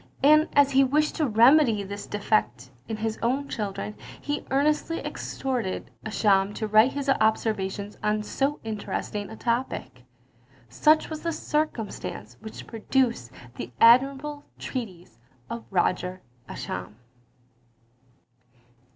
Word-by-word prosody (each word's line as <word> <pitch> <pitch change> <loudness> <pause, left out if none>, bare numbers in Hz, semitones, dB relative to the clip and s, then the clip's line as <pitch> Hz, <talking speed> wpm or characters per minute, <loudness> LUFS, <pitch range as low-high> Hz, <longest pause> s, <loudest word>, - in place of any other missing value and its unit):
And 305 +2 +6
as 285 -1 +5
he 270 0 +5
wished 300 +3 +2
to 310 - +1
remedy 235 -1 +5
this 200 +1 -7
defect 130 - -1 0.2
in 220 - -4
his 220 0 -3
own 265 +5 0
children, 210 -3 -4 0.3
he 290 0 -3
earnestly 300 +4 +1
exhorted 245 -8 -4
Ascham 205 -2 +2
to 220 - -2
write 215 +4 +5
his 280 0 -4
observations 215 -4 0
on 210 0 0
so 275 +6 -1
interesting 210 -1 -4
a 220 - -8
topic. 235 - -2 0.7
Such 305 - +3
was 310 - -5
the 335 - -1
circumstance 230 - -3
which 220 - -9
produced 230 - 0 0.3
the - - -6
admirable 275 +5 +4
treatise 180 - -7 0.3
of 230 0 -5
Roger 180 0 0 0.3
Ascham. 105 - -6
225 Hz, 115 wpm, -26 LUFS, 205-275 Hz, 0.7 s, And